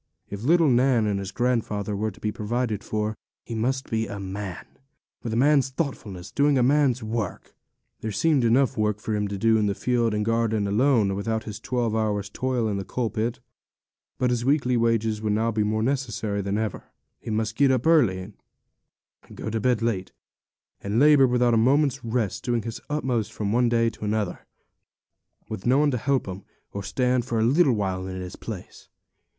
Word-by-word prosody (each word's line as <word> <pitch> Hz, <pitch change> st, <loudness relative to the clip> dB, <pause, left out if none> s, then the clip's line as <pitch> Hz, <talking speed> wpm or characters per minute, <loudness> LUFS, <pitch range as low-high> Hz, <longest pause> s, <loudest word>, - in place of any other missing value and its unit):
If 100 Hz, 0 st, -5 dB
little 165 Hz, +6 st, +4 dB
Nan 125 Hz, -3 st, +3 dB
and 100 Hz, -2 st, 0 dB
his 100 Hz, 0 st, -5 dB
grandfather 110 Hz, -4 st, -1 dB
were 110 Hz, +2 st, -1 dB
to 100 Hz, -, -14 dB
be 105 Hz, -, -2 dB
provided 110 Hz, 0 st, -2 dB
for, 110 Hz, 0 st, -2 dB, 0.3 s
he 115 Hz, -, -7 dB
must 130 Hz, +4 st, -1 dB
be 110 Hz, -1 st, 0 dB
a 100 Hz, 0 st, -6 dB
man, 95 Hz, -1 st, -6 dB, 0.6 s
with 115 Hz, -, -4 dB
a -, -, -1 dB
man's 140 Hz, 0 st, +4 dB
thoughtfulness, 115 Hz, -, -5 dB
doing 145 Hz, 0 st, +3 dB
man's 135 Hz, -3 st, +2 dB
work. 110 Hz, -1 st, -4 dB, 0.5 s
There 110 Hz, -, -4 dB
seemed 140 Hz, +6 st, +2 dB
enough 125 Hz, +3 st, +3 dB
work 105 Hz, -2 st, 0 dB
for 110 Hz, -, -3 dB
him 105 Hz, -1 st, 0 dB
to 100 Hz, 0 st, -4 dB
do 115 Hz, +2 st, +3 dB
in 105 Hz, -1 st, +1 dB
the 100 Hz, -, -1 dB
field 120 Hz, -2 st, 0 dB
and 105 Hz, 0 st, -1 dB
garden 115 Hz, -2 st, +1 dB
alone, 110 Hz, -1 st, +2 dB
without 110 Hz, +3 st, -2 dB
his 105 Hz, -1 st, -7 dB
twelve 120 Hz, -1 st, -1 dB
hours' 105 Hz, -2 st, -1 dB
toil 125 Hz, -1 st, -1 dB
in 105 Hz, -2 st, -1 dB
the 100 Hz, -, -3 dB
coal 120 Hz, +2 st, -2 dB
pit; 115 Hz, +2 st, -2 dB, 0.8 s
but 125 Hz, -1 st, +1 dB
his 120 Hz, -1 st, 0 dB
weekly 130 Hz, -2 st, +2 dB
wages 115 Hz, -2 st, +1 dB
would 105 Hz, -1 st, 0 dB
now 115 Hz, +2 st, +1 dB
be 110 Hz, -1 st, 0 dB
more 110 Hz, +1 st, 0 dB
necessary 115 Hz, -6 st, -1 dB
than 100 Hz, +1 st, -2 dB
ever. 110 Hz, -3 st, -3 dB, 0.3 s
He -, -, -8 dB
must 110 Hz, 0 st, -1 dB
get 140 Hz, -1 st, +4 dB
up 130 Hz, -2 st, +1 dB
early, 125 Hz, -, +4 dB, 1.0 s
and -, -, -15 dB
go 110 Hz, -, -4 dB
to 115 Hz, -, -1 dB
bed 120 Hz, -1 st, +1 dB
late, 100 Hz, -5 st, -1 dB, 0.7 s
and 100 Hz, +2 st, -2 dB
labour 145 Hz, -2 st, +6 dB
without 125 Hz, -1 st, +2 dB
a -, -, +4 dB
moment's 135 Hz, +3 st, +2 dB
rest, 115 Hz, -4 st, -2 dB
doing 120 Hz, -3 st, 0 dB
his 115 Hz, 0 st, -6 dB
utmost 125 Hz, -7 st, -1 dB
from 105 Hz, -3 st, -3 dB
one 120 Hz, 0 st, +3 dB
day 115 Hz, -1 st, +2 dB
to 110 Hz, -, -12 dB
another, 105 Hz, -3 st, -2 dB, 1.0 s
with 95 Hz, -, -5 dB
no 130 Hz, +2 st, +4 dB
one 145 Hz, 0 st, +3 dB
to 125 Hz, -, 0 dB
help 135 Hz, 0 st, 0 dB
him, 95 Hz, +1 st, -6 dB, 0.3 s
or 100 Hz, -, -4 dB
stand 125 Hz, +5 st, 0 dB
for 120 Hz, -1 st, -2 dB
a -, -, +2 dB
little 135 Hz, +3 st, +4 dB
while 95 Hz, -3 st, -2 dB
in 95 Hz, 0 st, -5 dB
his 90 Hz, -1 st, -7 dB
place. -, -, -9 dB
115 Hz, 195 wpm, -25 LUFS, 105-125 Hz, 1.0 s, labour